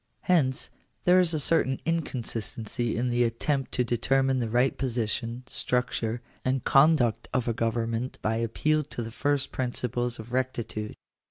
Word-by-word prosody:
Hence, 145 -7 +1 0.3
there 180 +1 +6
is 180 -2 +3
a 155 - 0
certain 135 -3 +2
inconsistency 120 -7 -2
in 125 +1 0
the 120 0 +3
attempt 130 +4 -1
to 125 - +2
determine 130 +3 +1
the 115 -2 -1
right 125 +4 +2
position, 120 -1 -2
structure, 125 -2 -1 0.2
and 130 0 0
conduct 135 -5 +4
of 125 -2 +1
a 115 - +1
govern 115 0 -1
ment 120 +3 -3
by 110 +1 +1
appeal 150 +7 +1
to 120 -4 -5
the 115 - -6
first 140 +4 0
principles 120 -1 -1
of 115 +2 -9
rectitude. 120 -4 -2
125 Hz, 155 wpm, -27 LUFS, 115-135 Hz, 0.3 s, there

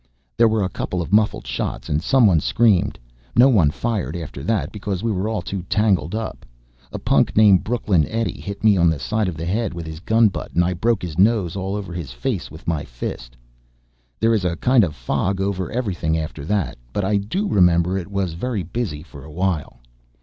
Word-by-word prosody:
There 115 - +5
were 110 -2 +1
a - - +1
couple 90 - -3
of 85 +2 -4
muffled 105 0 +2
shots - - -4
and 75 +1 0
someone 105 -7 +4
screamed. 105 +2 +2 0.4
No 125 +4 +7
one 95 - +4
fired 110 +3 -2
after 80 -5 -6
that 110 +1 0
because 100 -3 -4
we 115 - +1
were 105 +3 -1
too 95 +1 -4
tangled 105 -4 +1
up. 110 0 -5 0.5
A - - -4
punk - - +1
named 105 -4 +6
Brooklyn 105 -9 +1
Eddie 115 -3 -2
hit 100 +1 -7
me 105 -3 +5
on 85 -1 +4
the 80 - 0
side 105 +11 -1
of 85 -4 -4
the 80 - -4
head 105 +1 -1
with 85 -1 -6
his 80 0 -7
gunbutt 110 +2 +1
and 85 +1 +4
I 90 - 0
broke 110 +3 0
his 85 -2 -5
nose 100 -4 +3
all 95 +1 -3
over 100 -4 -5
his 85 -7 -5
face - - -3
with 80 - -13
my 80 -3 0
fist. - - -7 0.8
There 115 +1 +3
is 105 -4 +1
a 90 -2 0
kind 125 +6 +4
of 90 - +1
a - - -18
fog 90 +10 -1
over 95 -2 -2
everything 90 -10 -1
after 80 -2 -5
that. 100 -7 -1
But 100 - -1
I 100 +1 +2
do 145 - -2
remember 90 - +3
it 95 -2 -4
was 100 -4 -2
very 105 +3 -3
busy 85 -5 -4
for 70 -5 -13
a 75 - -11
while. 80 -8 -2
95 Hz, 210 wpm, -21 LUFS, 85-110 Hz, 0.8 s, No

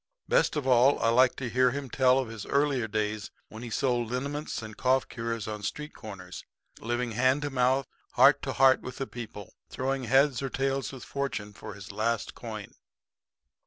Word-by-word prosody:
Best - - +3
of 150 -3 -2
all 130 +2 +5
I 115 - +2
like 125 +2 +4
to 130 - -4
hear 125 +2 +3
him 140 +2 -4
tell 130 +1 +3
of 130 -2 0
his 110 -2 -8
earlier 140 -5 +1
days 105 0 -2 0.2
when 110 - -9
he 120 - -6
sold 120 -1 0
liniments 140 +1 -3
and 110 -1 -8
cough 130 0 +2
cures 115 -2 -4
on 105 -1 -5
street 150 +8 -5
corners, 90 -6 -9 0.4
living 120 +1 -2
hand 130 +5 +2
to 145 - -2
mouth, 130 +1 +2 0.3
heart - - +6
to - - -3
heart 130 -1 +5
with 125 - -8
the 135 - -2
people, 110 -6 -9 0.2
throwing 135 0 -2
heads 135 +2 +3
or 135 - -2
tails 135 +1 -1
with 130 -3 -9
fortune 120 -7 -4
for 105 0 -9
his 100 0 -9
last 110 +2 -1
coin. - - -8
125 Hz, 190 wpm, -28 LUFS, 110-135 Hz, 0.4 s, heart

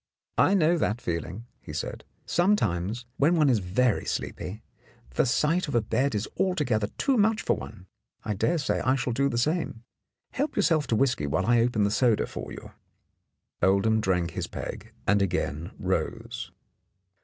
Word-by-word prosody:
"I 200 - +5
know 170 -2 +3
that 110 -5 0
feeling," 90 +4 -4
he - - -9
said. - - -5 0.2
"Sometimes, 120 - +1
when 155 +5 +4
one 150 -4 +4
is 115 - +3
very 100 +6 +1
sleepy, 105 +5 -4 0.5
the 65 - +2
sight 160 +8 +2
of 145 - -3
a 120 - +4
bed 130 +3 0
is 105 - -1
alto 185 -4 +2
gether 110 -6 +1
too 270 -2 +2
much 220 +1 +2
for - - +2
one. 105 -4 -9 0.4
I 105 - -1
dare 160 - +1
say 145 -5 0
I 130 +1 +2
shall 125 -2 -1
do 140 +3 +2
the 120 - -2
same. 150 -3 -1 0.5
Help 290 +2 -2
yourself 165 -7 +2
to 115 - +1
whisky 120 - +1
while 95 +7 0
I 120 +2 +4
open 115 -3 +2
the 100 - +2
soda 115 0 +3
for - - -7
you." - - -9 0.9
Oldham 105 +4 +3
drank 90 -3 0
his - - -3
peg - - -7
and 100 0 +3
again 80 -4 -1
rose. - - -3
120 Hz, 175 wpm, -27 LUFS, 100-155 Hz, 0.9 s, I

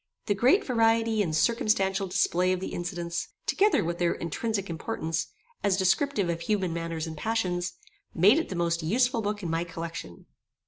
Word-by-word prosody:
The 205 - +2
great 260 - +3
variety 225 -2 +2
and 160 -6 -1
circumstantial 195 -2 +1
display 180 0 +2
of 185 - -2
the 190 - -4
incidents, 175 -1 -3 0.2
together 415 +2 +3
with 170 +1 -3
their 175 -1 +2
intrinsic 200 +4 -3
importance, 160 0 -3 0.4
as 195 -2 +2
descriptive 200 +3 +2
of 170 -1 -2
human 185 -1 0
manners 165 -1 -3
and 160 -1 -6
passions, 180 -2 -1 0.4
made 205 - +5
it 330 - -3
the 185 - -4
most 170 0 0
useful 235 - +1
book 205 -1 -3
in 170 - -2
my 165 +1 0
collection. 165 - -7
185 Hz, 170 wpm, -27 LUFS, 170-220 Hz, 0.4 s, made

